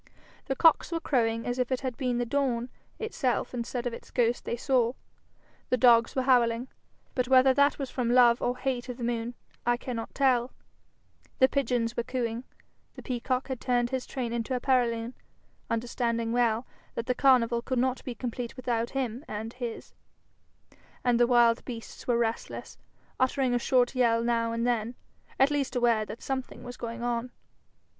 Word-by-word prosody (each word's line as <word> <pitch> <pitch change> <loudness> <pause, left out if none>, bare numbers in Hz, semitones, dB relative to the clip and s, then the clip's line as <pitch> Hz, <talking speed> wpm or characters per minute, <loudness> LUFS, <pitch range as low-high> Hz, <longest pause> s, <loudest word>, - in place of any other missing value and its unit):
The 270 - -1
cocks 325 +4 +4
were 335 - -1
crowing 230 -7 0
as 245 +1 -2
if 250 0 0
it 260 - 0
had 260 -3 -3
been 250 -2 -1
the 245 - 0
dawn 250 -2 0 0.3
itself 310 - -1
instead 240 0 -3
of 245 - -2
its - - -10
ghost 240 -1 +1
they - - -1
saw; 245 -2 +2 0.8
the 255 - +2
dogs 230 -1 +5
were 260 - +1
howling, 245 -1 +3 0.4
but 250 -1 0
whether 260 0 +6
that 280 +2 +3
was 275 -3 -5
from 245 -3 -1
love 240 -1 +5
or 245 +1 0
hate 255 -1 -2
of 245 - -5
the 245 - -6
moon, 235 0 -2 0.3
I 240 0 +2
cannot 240 -3 -6
tell; 255 -3 +2 0.8
the 260 - +6
pigeons 245 -4 0
were - - 0
cooing; 235 0 -3 0.5
the - - -10
peacock 255 0 -2
had 260 -3 -5
turned 245 -1 +1
his 260 -1 -2
train 240 -3 -3
into 235 +2 -2
a - - -1
paralune, 240 -2 +1 0.6
understanding 230 0 -1
well 235 0 +1 0.3
that 230 - -3
the 250 - +1
carnival 245 -3 +3
could 260 +1 -2
not 255 +1 0
be 250 - -5
complete 240 +1 -5
without 240 -3 -1
him 250 0 -2
and 220 +2 -5
his; 240 -3 -6 1.1
and 245 -1 +3
the 240 - +5
wild 235 -1 +4
beasts 230 -3 -8
were 240 -2 +3
restless, 230 -1 -3 0.4
uttering 260 -1 +2
a 245 - +2
short 245 0 +2
yell 230 -3 +2
now 230 -1 +1
and 230 +1 -1
then, 240 -1 0 0.4
at 270 +2 +5
least 275 -3 -1
aware 235 -3 +2
that 215 +2 -9
something 265 -1 -4
was 245 0 -7
going 235 0 -6
on. 240 0 -2
245 Hz, 180 wpm, -28 LUFS, 235-255 Hz, 1.1 s, whether